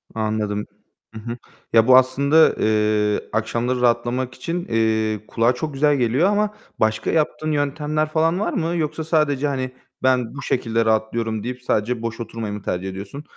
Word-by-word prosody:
Anladım. 110 -1 -1 0.5
I - - -5
hı. 115 +2 -6 0.4
Ya, 115 0 +5
bu 130 0 +8
aslında, 140 +5 +4
eee, 105 -1 +2
akşamları 120 +3 -1
rahatlamak 120 +1 +1
için, 170 +6 -4
eee, 110 -1 +1
kulağa 115 +2 +2
çok 150 +4 -4
güzel 145 +2 +3
geliyor 130 - +2
ama 210 0 +1 0.3
başka 110 0 +1
yaptığın 155 0 0
yöntemler 150 +1 -1
falan 165 +3 +1
var 210 - -1
mı? 170 -1 -1
Yoksa 155 -1 -2
sadece, 150 -3 +1
hani, 130 -2 -2 0.3
"Ben 130 -2 +1
bu 145 - -6
şekilde 115 -4 0
rahatlıyorum." 110 0 0
deyip 125 +1 -5
sadece 115 0 0
boş 115 0 -4
oturmayı 115 -2 -5
mı 105 - -6
tercih 95 0 -3
ediyorsun. 100 +9 -8
125 Hz, 160 wpm, -22 LUFS, 110-150 Hz, 0.5 s, bu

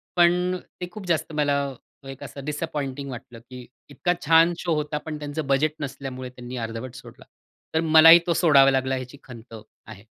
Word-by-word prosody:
पण 180 +1 +3
अ, - - -6 0.2
ते 180 - -3
खूप 215 -3 -9
जास्त 165 -2 -1
मला 145 -1 +1 0.5
एक 135 -1 -9
असं 140 -1 -9
डिसअपॉइंटिंग 145 -3 -4
वाटलं 120 -1 -10
की 125 -1 -10 0.2
इतका 175 +5 -1
छान 165 +2 +5
शो 170 - -1
होता, 150 0 -2
पण 155 0 -6
त्यांचं 145 0 -5
बजेट 145 +3 +1
नसल्यामुळे 135 -2 -6
त्यांनी 125 0 -9
अर्धवट 115 +3 -8
सोडला. - - -13 0.5
तर 160 - +1
मलाही 165 +1 +8
तो 170 - +2
सोडावा 140 -6 +5
लागला, 130 0 0
याची 130 +2 -9
खंत 115 -2 -13 0.3
आहे. 105 -1 -13
145 Hz, 175 wpm, -24 LUFS, 130-160 Hz, 0.5 s, मलाही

